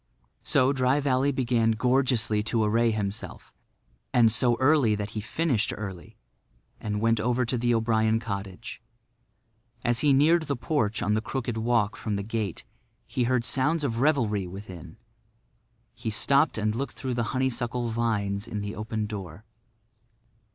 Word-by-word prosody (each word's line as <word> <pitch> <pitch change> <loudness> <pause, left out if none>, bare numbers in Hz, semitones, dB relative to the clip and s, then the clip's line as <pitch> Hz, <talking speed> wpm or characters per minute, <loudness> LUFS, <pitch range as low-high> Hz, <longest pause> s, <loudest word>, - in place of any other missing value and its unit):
So 130 +2 +3
Dry 130 +1 +2
Valley 140 0 +1
began 120 -4 +1
gorgeously 125 -2 +1
to 110 0 +1
array 115 +2 +2
himself; 105 -2 -4 0.6
and 115 -2 +5
so 120 +2 +4
early 130 -5 +4
that 105 0 -4
he 105 - -4
finished 125 -1 0
early, 95 -4 -8 0.6
and 105 -1 -3
went 115 0 +2
over 125 +3 +1
to 120 - -2
the 120 0 +1
O'Brien 110 0 +2
cottage. 100 0 -6 1.0
As 120 -1 +2
he 145 0 +3
neared 155 +4 +4
the 140 - -1
porch 120 -4 -1
on 105 - +1
the 110 - +1
crooked 120 0 -3
walk 115 -2 +1
from 105 -2 -3
the 100 - -3
gate 105 -3 -3 0.4
he 125 - -1
heard 125 -1 +1
sounds 145 +5 +2
of 115 -5 -1
revelry 115 -10 +1
within. 90 -3 -10 1.0
He 115 -1 -5
stopped 135 +7 +2
and 110 0 0
looked 135 +5 -4
through 130 -2 -4
the 120 -1 -1
honeysuckle 120 -2 -1
vines 105 -3 -1
in 105 - -4
the 100 +1 -5
open 110 0 -3
door. 100 -2 -8
115 Hz, 150 wpm, -26 LUFS, 105-130 Hz, 1.0 s, and